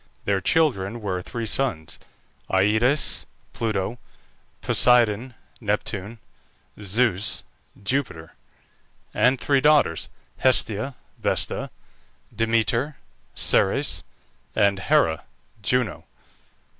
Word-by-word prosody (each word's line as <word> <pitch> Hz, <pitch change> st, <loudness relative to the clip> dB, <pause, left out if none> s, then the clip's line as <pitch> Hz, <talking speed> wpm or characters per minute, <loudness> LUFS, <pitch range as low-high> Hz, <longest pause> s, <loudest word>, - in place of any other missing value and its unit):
Their 100 Hz, -1 st, +1 dB
children 120 Hz, -, +1 dB
were, 95 Hz, -4 st, -3 dB
three 115 Hz, +4 st, -5 dB
sons: 105 Hz, -, -1 dB, 0.5 s
Aïdes 110 Hz, +9 st, +2 dB, 0.3 s
(Pluto), 110 Hz, 0 st, -2 dB, 0.6 s
Poseidon 120 Hz, 0 st, +3 dB, 0.2 s
(Neptune), 105 Hz, 0 st, -2 dB, 0.6 s
Zeus 105 Hz, 0 st, +1 dB, 0.4 s
(Jupiter), 100 Hz, -, -2 dB, 0.8 s
and 125 Hz, +4 st, +3 dB
three 140 Hz, -2 st, +2 dB
daughters: 150 Hz, -, +3 dB, 0.3 s
Hestia 130 Hz, 0 st, +1 dB, 0.2 s
(Vesta), -, -, -1 dB, 0.7 s
Demeter 115 Hz, +5 st, +1 dB, 0.4 s
(Ceres), -, -, +2 dB, 0.5 s
and 100 Hz, -2 st, +3 dB
Hera 105 Hz, -, +2 dB, 0.4 s
(Juno). 125 Hz, +3 st, 0 dB
110 Hz, 75 wpm, -24 LUFS, 100-125 Hz, 0.8 s, Poseidon